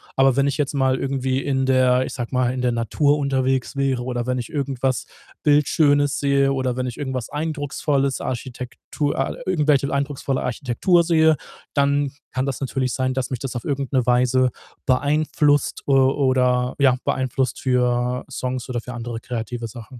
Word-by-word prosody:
Aber 135 -1 +4
wenn 140 0 +3
ich 140 - 0
jetzt 145 -2 -1
mal 130 -2 +2
irgendwie 135 -1 -1
in 135 -1 0
der 130 -1 +3
ich - - -6
sage 120 -3 -4
mal, 125 -1 +1
in 130 - -3
der 125 -1 +1
Natur 140 +6 +1
unterwegs 135 -2 0
wäre 135 -3 0
oder 120 -2 -2
wenn 125 0 -1
ich 120 -2 -4
irgendwas 135 -3 -1 0.4
Bildschönes 145 -1 +3
sehe 140 -1 +2
oder 130 -2 -1
wenn 130 0 -1
ich 120 - -5
irgendwas 130 -4 -3
Eindrucksvolles, 145 -2 -1
Architektur 130 +4 -4
a 135 - -1
irgendwelche 150 -6 +2
eindrucksvolle 140 -1 -1
Architektur 135 +8 +1
sehe, 160 -2 +4 0.4
dann 140 -1 +2 0.2
kann 130 +1 -1
das 140 -2 -3
natürlich 130 -1 -1
sein, 130 -1 0
dass 130 -1 -3
mich 130 - -2
das 130 -1 -4
auf 120 - -7
irgend 140 -2 -2
'ne 130 -3 +2
Weise 125 +1 +3 0.3
beeinflusst, 145 +2 +1
äh, - - +1
oder 130 -2 +3
ja 135 -3 +5
beeinflusst 130 0 -1
für 125 -1 +1
Songs 130 -1 -4
oder 125 -1 -1
für 125 +2 -8
andere 120 -1 -5
kreative 120 0 -5
Sachen. 120 +2 -11
130 Hz, 170 wpm, -22 LUFS, 125-140 Hz, 0.4 s, ja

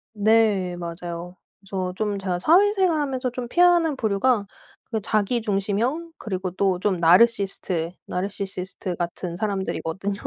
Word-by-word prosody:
네 210 -4 +3
맞아요. 170 +1 -6 0.2
그래서 190 -1 -4
좀 205 -1 -2
제가 185 -2 -2
사회생활 370 - +4
하면서 260 -3 -2
좀 250 0 -5
피하는 345 +1 +4
부류가 220 -1 +1 0.5
그 220 -2 -1
자기중심형 215 - 0
그리고 185 -4 -3
또 190 0 +1
좀 190 -2 0
나르시스트 185 -2 +3
나르시시스트 190 -1 -4
같은 175 0 -4
사람들이거든요. 195 -1 -2
200 Hz, 320 characters per minute, -24 LUFS, 185-240 Hz, 0.5 s, 사회생활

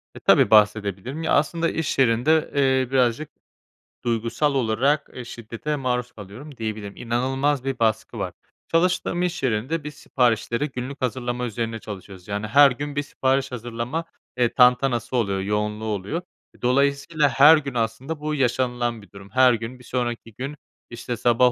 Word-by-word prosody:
E, - - -9
tabii, - - +4
bahsedebilirim. 105 - +2
Ya, - - -1
aslında 165 +3 +2
iş 160 -4 -2
yerinde, 135 +6 +3
eee, 130 -2 +2
birazcık 130 +2 +1 0.7
duygusal 120 +5 0
olarak 135 +4 +1 0.2
şiddete 115 +6 -5
maruz 125 -3 -2
kalıyorum 115 +8 -11
diyebilirim. 110 -2 -5
İnanılmaz 130 +4 0
bir 135 -1 -3
baskı 110 -1 0
var. - - -3 0.3
Çalıştığım 175 +1 +1
iş 175 -4 -2
yerinde 130 +7 -1
biz 150 0 -6
siparişleri 120 +1 0
günlük 130 +2 -6
hazırlama 125 -1 -2
üzerine 115 -1 -3
çalışıyoruz. 95 -3 -10
Yani, 105 +1 -3
her 140 +5 +6
gün 145 +3 -5
bir 145 - 0
sipariş 135 -1 0
hazırlama, 120 +6 -4 0.3
eee, 120 -2 +2
tantanası 125 -1 +3
oluyor, 100 -5 0
yoğunluğu 105 +2 -2
oluyor. 105 - -3 0.4
Dolayısıyla 140 +4 +2
her 145 +4 +7
gün 140 -3 -4
aslında 120 +7 -2
bu 150 0 -2
yaşanılan 120 -3 0
bir 100 -3 -18
durum. 100 0 -13
Her 130 +1 +5
gün 115 +2 -5
bir - - -15
sonraki 120 -2 -3
gün, 135 +6 -6 0.3
işte, 120 0 -5
sabah 120 +1 +4
125 Hz, 150 wpm, -23 LUFS, 115-140 Hz, 0.7 s, her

